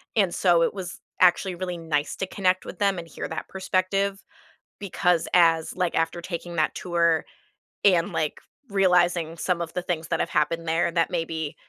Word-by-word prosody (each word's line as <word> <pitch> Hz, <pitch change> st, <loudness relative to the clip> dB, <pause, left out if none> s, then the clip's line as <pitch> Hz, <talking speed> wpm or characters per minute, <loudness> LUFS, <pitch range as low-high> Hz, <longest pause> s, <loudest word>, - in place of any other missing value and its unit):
and 195 Hz, -6 st, +2 dB
so 175 Hz, -3 st, +3 dB
it 165 Hz, -, +2 dB
was 185 Hz, -2 st, -7 dB, 0.2 s
actually 180 Hz, +1 st, +4 dB
really 180 Hz, 0 st, -4 dB
nice 155 Hz, -3 st, -2 dB
to -, -, -3 dB
connect 185 Hz, -1 st, +1 dB
with 185 Hz, -, -9 dB
them 200 Hz, -2 st, +2 dB
and 165 Hz, -, -8 dB
hear -, -, -6 dB
that -, -, -5 dB
perspective 195 Hz, +1 st, -1 dB, 0.6 s
because 180 Hz, -3 st, +1 dB
as 165 Hz, -2 st, +4 dB
like, 180 Hz, -2 st, 0 dB
after 165 Hz, +1 st, 0 dB
taking 170 Hz, 0 st, -6 dB
that 155 Hz, -, +1 dB
tour 170 Hz, -2 st, +1 dB, 0.6 s
and, 180 Hz, -1 st, +4 dB
like, 155 Hz, -2 st, -1 dB, 0.3 s
realizing 180 Hz, -4 st, +2 dB
some 175 Hz, 0 st, -1 dB
of 165 Hz, -1 st, -5 dB
the 180 Hz, -, -2 dB
things 165 Hz, -2 st, -3 dB
that -, -, 0 dB
have -, -, -2 dB
happened 165 Hz, +2 st, 0 dB
there 165 Hz, +2 st, +2 dB
that 165 Hz, -1 st, +1 dB
maybe 160 Hz, -3 st, -3 dB
175 Hz, 180 wpm, -25 LUFS, 165-185 Hz, 0.6 s, actually